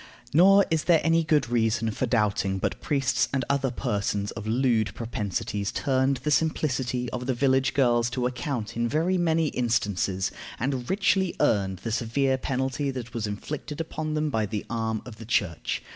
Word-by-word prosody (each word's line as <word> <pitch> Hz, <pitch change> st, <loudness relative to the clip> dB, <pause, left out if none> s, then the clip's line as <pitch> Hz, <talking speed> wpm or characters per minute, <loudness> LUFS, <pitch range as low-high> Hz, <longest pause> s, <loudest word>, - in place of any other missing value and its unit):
Nor 195 Hz, +5 st, +6 dB
is 160 Hz, -1 st, +1 dB
there 170 Hz, -3 st, +5 dB
any 165 Hz, 0 st, +3 dB
good 150 Hz, -4 st, +2 dB
reason 115 Hz, -1 st, +1 dB
for 125 Hz, +4 st, -2 dB
doubting 105 Hz, -4 st, +1 dB
but -, -, -2 dB
priests 135 Hz, -3 st, +1 dB
and 135 Hz, -3 st, -1 dB
other 140 Hz, -1 st, +1 dB
persons 105 Hz, -5 st, -2 dB
of 110 Hz, -, -7 dB
lewd 110 Hz, -4 st, +1 dB
propensities 105 Hz, -2 st, -3 dB
turned 135 Hz, 0 st, +1 dB
the 150 Hz, -, 0 dB
simplicity 130 Hz, -5 st, 0 dB
of 125 Hz, 0 st, -4 dB
the 130 Hz, -, +1 dB
village 130 Hz, +1 st, +2 dB
girls 120 Hz, -3 st, +3 dB
to 125 Hz, +1 st, -2 dB
account 125 Hz, -2 st, -3 dB
in 120 Hz, 0 st, 0 dB
very 170 Hz, +6 st, +1 dB
many 165 Hz, -2 st, +2 dB
instances, 100 Hz, -7 st, 0 dB, 0.3 s
and 130 Hz, 0 st, -2 dB
richly 190 Hz, -1 st, +2 dB
earned 95 Hz, -3 st, +1 dB
the 115 Hz, -, -3 dB
severe 130 Hz, +4 st, 0 dB
penalty 135 Hz, +2 st, -1 dB
that 125 Hz, -3 st, -6 dB
was 110 Hz, -2 st, -2 dB
inflicted 145 Hz, +8 st, -5 dB
upon 155 Hz, -1 st, -3 dB
them 150 Hz, -1 st, 0 dB
by 110 Hz, -3 st, 0 dB
the 105 Hz, 0 st, -4 dB
arm 110 Hz, -1 st, -2 dB
of 120 Hz, -4 st, -10 dB
the 115 Hz, -, -9 dB
Church. 95 Hz, -7 st, -1 dB
125 Hz, 175 wpm, -26 LUFS, 110-145 Hz, 0.3 s, Nor